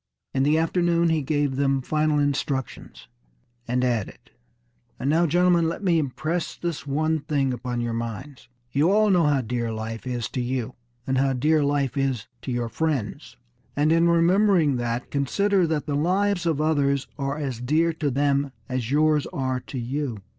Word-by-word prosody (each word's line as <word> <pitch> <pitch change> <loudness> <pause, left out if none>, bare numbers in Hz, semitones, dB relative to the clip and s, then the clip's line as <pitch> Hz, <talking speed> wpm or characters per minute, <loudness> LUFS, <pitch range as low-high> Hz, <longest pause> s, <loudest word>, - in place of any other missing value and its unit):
In 135 - +1
the 150 +3 +3
afternoon 170 +1 +2
he 160 -1 +1
gave 145 -1 0
them 135 -1 +1
final 155 +1 +1
instructions, 135 - -2 0.6
and 125 +1 0
added: 120 -5 -2 0.7
"And 140 - 0
now, 165 +2 +3
gentlemen, 175 0 +3
let 170 - -6
me 175 -4 +3
impress 155 +4 -3
this 170 -4 -4
one 155 +3 0
thing 140 -3 0
upon 120 0 -3
your 120 -1 -2
minds. 115 +5 -6 0.2
You 145 +6 +2
all 210 +1 +4
know 175 -4 +4
how 145 -2 +2
dear 120 -1 -2
life 110 +2 -5
is 120 -3 -2
to 130 - -3
you, 125 0 -3 0.3
and 130 0 0
how 135 0 +2
dear 150 +4 +2
life 140 -2 0
is 135 -5 -1 0.2
to 130 - -5
your 120 -1 -1
friends. 135 - -3 0.4
And 150 +2 +2
in 165 +1 +4
remembering 170 -3 +3
that, 120 0 -3
consider 185 +7 +1
that 155 -2 -1
the 145 - -2
lives 180 +3 +1
of 160 -3 +1
others 140 -3 +1
are 140 +1 -2
as 135 -6 -4
dear 160 +6 +2
to 155 -2 -1
them 140 +1 +1 0.2
as 125 -4 -3
yours 150 +1 +2
are 130 -2 -2
to 125 +1 -8
you. 125 -3 -3
140 Hz, 175 wpm, -24 LUFS, 125-160 Hz, 0.7 s, all